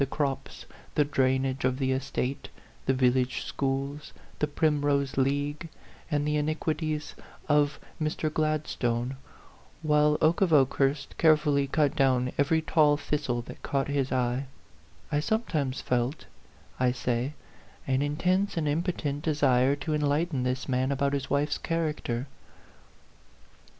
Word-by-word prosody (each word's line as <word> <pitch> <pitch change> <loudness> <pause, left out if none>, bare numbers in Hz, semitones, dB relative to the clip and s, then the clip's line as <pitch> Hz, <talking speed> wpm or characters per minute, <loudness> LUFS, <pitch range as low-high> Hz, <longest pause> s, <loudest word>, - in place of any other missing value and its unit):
97 135 - +1
the - - -8
crops, 140 -3 -2 0.3
the 150 - +4
drainage 130 -1 +1
of 130 0 +1
the 130 -1 0
estate, 130 0 -2 0.4
the 135 - +4
vil 125 -1 +4
lage 130 -1 -1
schools, 140 +2 -3 0.3
the 150 - +1
Primrose 145 -2 +1
League, 145 +4 0 0.4
and 145 -2 0
the 150 0 +1
iniquities 155 0 -2 0.3
of 145 -1 +2 0.2
Mr. 155 0 -1
Gladstone, 135 -5 -1 0.7
while 150 -1 +3
Oke 160 +4 +3
of 185 -3 +3
Okehurst 140 0 +2
carefully 150 -3 +4
cut 150 +1 +1
down 130 -3 +2
every 160 +3 +2
tall 150 -2 +3
this 150 -1 +1
tle 120 -1 -1
that - - -11
caught 140 0 -1
his 140 -2 0
eye 125 +1 0 0.6
I 145 - +2
sometimes 150 - -1
felt, 125 +4 -1 0.5
I 125 -1 +3
say, 125 +2 -1 0.5
an 130 0 +1
intense 180 +7 0
and 155 -2 0
impotent 150 -2 -1
desire 140 -4 +3
to 150 +2 -3
en 150 - 0
lighten 145 0 +1
this 125 +1 -2
man 130 0 +1
about 140 0 0
his 140 -1 -2
wife's 145 +1 0
character. 150 -7 -2
145 Hz, 140 wpm, -28 LUFS, 130-150 Hz, 0.7 s, the